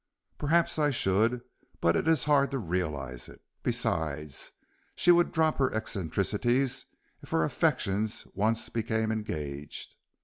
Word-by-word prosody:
"Perhaps 160 Hz, +2 st, +2 dB
I 150 Hz, -1 st, +3 dB
should, 115 Hz, 0 st, +2 dB, 0.4 s
but 85 Hz, 0 st, +3 dB
it -, -, 0 dB
is 160 Hz, -1 st, +4 dB
hard 140 Hz, -2 st, +4 dB
to 135 Hz, -, -2 dB
realize 75 Hz, -, -3 dB
it. -, -, -14 dB, 0.2 s
Besides, 75 Hz, -3 st, -2 dB, 0.4 s
she 175 Hz, -, +5 dB
would 175 Hz, 0 st, +4 dB
drop 160 Hz, -2 st, +1 dB
her 135 Hz, -1 st, +3 dB
eccentricities 110 Hz, -, 0 dB, 0.3 s
if -, -, -13 dB
her 80 Hz, -, +2 dB
affections 105 Hz, +6 st, 0 dB
once 110 Hz, +3 st, 0 dB
became 110 Hz, -1 st, -1 dB
engaged." 75 Hz, -10 st, -4 dB
110 Hz, 130 wpm, -29 LUFS, 80-135 Hz, 0.4 s, she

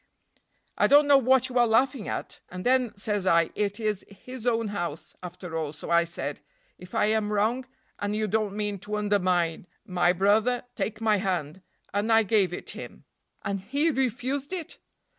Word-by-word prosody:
"I -, -, +5 dB
don't 290 Hz, +1 st, +6 dB
know 285 Hz, -1 st, +6 dB
what 260 Hz, 0 st, +3 dB
you 255 Hz, -1 st, 0 dB
are 240 Hz, -, +5 dB
laughing 245 Hz, +1 st, +2 dB
at; -, -, -5 dB
and 180 Hz, 0 st, -7 dB
then, 250 Hz, -4 st, +2 dB
says 205 Hz, -2 st, -1 dB
I, 170 Hz, -2 st, +4 dB
it 205 Hz, 0 st, -2 dB
is 215 Hz, -3 st, -1 dB
his 245 Hz, +5 st, -9 dB
own 230 Hz, -2 st, +1 dB
house, 175 Hz, -6 st, -5 dB
after 180 Hz, -1 st, -8 dB
all, 155 Hz, -2 st, -2 dB
so 150 Hz, -, -8 dB
I 170 Hz, 0 st, +5 dB
said, 170 Hz, -, -5 dB, 0.4 s
'If 180 Hz, 0 st, -11 dB
I -, -, +3 dB
am 215 Hz, -1 st, +1 dB
wrong, 225 Hz, +5 st, 0 dB, 0.3 s
and 205 Hz, +1 st, -2 dB
you 215 Hz, 0 st, 0 dB
don't 210 Hz, -1 st, 0 dB
mean 205 Hz, -2 st, -2 dB
to 210 Hz, +3 st, -5 dB
undermine 185 Hz, -5 st, +1 dB, 0.2 s
my 180 Hz, -3 st, +2 dB
brother, 210 Hz, +7 st, +2 dB
take 220 Hz, -1 st, -3 dB
my 215 Hz, -2 st, +3 dB
hand;' 185 Hz, -4 st, -2 dB, 0.3 s
and 205 Hz, +3 st, 0 dB
I 225 Hz, 0 st, +6 dB
gave 200 Hz, -3 st, +2 dB
it 175 Hz, -, -5 dB
him." -, -, -9 dB, 0.4 s
"And 200 Hz, 0 st, -1 dB
he 285 Hz, -, +1 dB
refused 265 Hz, -, -1 dB
it?" 345 Hz, -4 st, -5 dB
210 Hz, 180 wpm, -27 LUFS, 185-245 Hz, 0.4 s, don't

